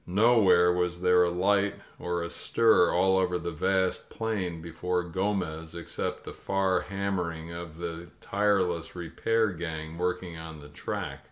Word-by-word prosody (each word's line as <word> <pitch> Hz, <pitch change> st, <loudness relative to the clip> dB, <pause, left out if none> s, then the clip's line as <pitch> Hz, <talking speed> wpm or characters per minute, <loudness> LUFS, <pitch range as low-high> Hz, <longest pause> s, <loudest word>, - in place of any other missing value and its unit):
Nowhere 100 Hz, -3 st, +5 dB
was 90 Hz, 0 st, -1 dB
there 90 Hz, 0 st, +5 dB
a -, -, +1 dB
light 100 Hz, +3 st, +2 dB, 0.2 s
or 85 Hz, -1 st, -2 dB
a 85 Hz, -, -4 dB
stir 115 Hz, -6 st, +3 dB
all 95 Hz, +1 st, +3 dB
over 90 Hz, -1 st, +1 dB
the 85 Hz, 0 st, -4 dB
vast 95 Hz, +3 st, 0 dB
plain 100 Hz, -7 st, -3 dB
before 90 Hz, +2 st, -2 dB
Gomez, 90 Hz, -3 st, -2 dB
except 85 Hz, -1 st, -4 dB
the -, -, -8 dB
far 95 Hz, -1 st, 0 dB
hammering 90 Hz, -4 st, -3 dB
of 85 Hz, -2 st, -8 dB
the 85 Hz, 0 st, -6 dB
tireless 95 Hz, -5 st, 0 dB
repair 110 Hz, +6 st, 0 dB
gang 80 Hz, -2 st, -5 dB
working 90 Hz, -1 st, -2 dB
on 80 Hz, -1 st, -8 dB
the 75 Hz, 0 st, -12 dB
track. 75 Hz, -, -5 dB
90 Hz, 150 wpm, -28 LUFS, 85-95 Hz, 0.2 s, Nowhere